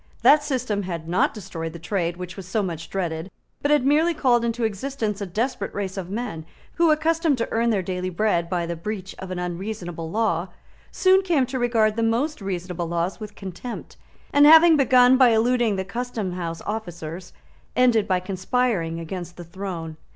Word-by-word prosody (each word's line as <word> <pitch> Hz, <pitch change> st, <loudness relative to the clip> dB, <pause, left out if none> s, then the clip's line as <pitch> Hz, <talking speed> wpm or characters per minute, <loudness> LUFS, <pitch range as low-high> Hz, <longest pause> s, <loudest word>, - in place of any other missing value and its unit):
That 300 Hz, +1 st, +7 dB
system 250 Hz, -7 st, -1 dB
had 170 Hz, -4 st, -5 dB
not 175 Hz, +2 st, +2 dB
destroyed 165 Hz, -6 st, -6 dB
the -, -, -7 dB
trade 170 Hz, 0 st, -2 dB
which 180 Hz, 0 st, -7 dB
was 190 Hz, -3 st, -9 dB
so 205 Hz, +3 st, 0 dB
much 165 Hz, -3 st, -5 dB
dreaded, 170 Hz, -2 st, -3 dB, 0.3 s
but 290 Hz, -, 0 dB
had 295 Hz, -3 st, +3 dB
merely 315 Hz, +4 st, +3 dB
called 245 Hz, -5 st, +3 dB
into 235 Hz, 0 st, -1 dB
existence 220 Hz, -1 st, -2 dB
a 200 Hz, -, -3 dB
desperate 210 Hz, +3 st, -2 dB
race 195 Hz, -2 st, -3 dB
of 185 Hz, -3 st, -5 dB
men 200 Hz, -6 st, -4 dB, 0.3 s
who, 335 Hz, -1 st, +4 dB
accustomed 315 Hz, -1 st, +2 dB
to 230 Hz, -, -1 dB
earn 230 Hz, +1 st, +1 dB
their 205 Hz, -4 st, +1 dB
daily 180 Hz, 0 st, -3 dB
bread 175 Hz, -2 st, 0 dB
by 175 Hz, -1 st, -1 dB
the 170 Hz, 0 st, -3 dB
breach 190 Hz, +2 st, -5 dB
of 190 Hz, -, -7 dB
an 185 Hz, -, -4 dB
unreasonable 175 Hz, -2 st, -5 dB
law, 195 Hz, -3 st, 0 dB, 0.4 s
soon 380 Hz, 0 st, +4 dB
came 335 Hz, -8 st, +2 dB
to 260 Hz, +1 st, -4 dB
regard 225 Hz, -3 st, +2 dB
the -, -, +1 dB
most 235 Hz, +6 st, 0 dB
reasonable 180 Hz, -2 st, -4 dB
laws 170 Hz, +4 st, -2 dB
with 210 Hz, -1 st, -8 dB
contempt, 195 Hz, +5 st, -7 dB, 0.4 s
and, 290 Hz, +1 st, +7 dB
having 320 Hz, +1 st, +8 dB
begun 255 Hz, -2 st, +5 dB
by 255 Hz, -2 st, +6 dB
eluding 230 Hz, -1 st, +2 dB
the 190 Hz, 0 st, -3 dB
custom 225 Hz, -2 st, -4 dB
house 170 Hz, -2 st, -5 dB
officers, 175 Hz, -5 st, -5 dB, 0.4 s
ended 240 Hz, -4 st, +3 dB
by 185 Hz, -1 st, +2 dB
conspiring 185 Hz, -2 st, -1 dB
against 175 Hz, +1 st, -6 dB
the 175 Hz, -, -7 dB
throne. 170 Hz, -2 st, -6 dB
200 Hz, 185 wpm, -24 LUFS, 175-245 Hz, 0.4 s, having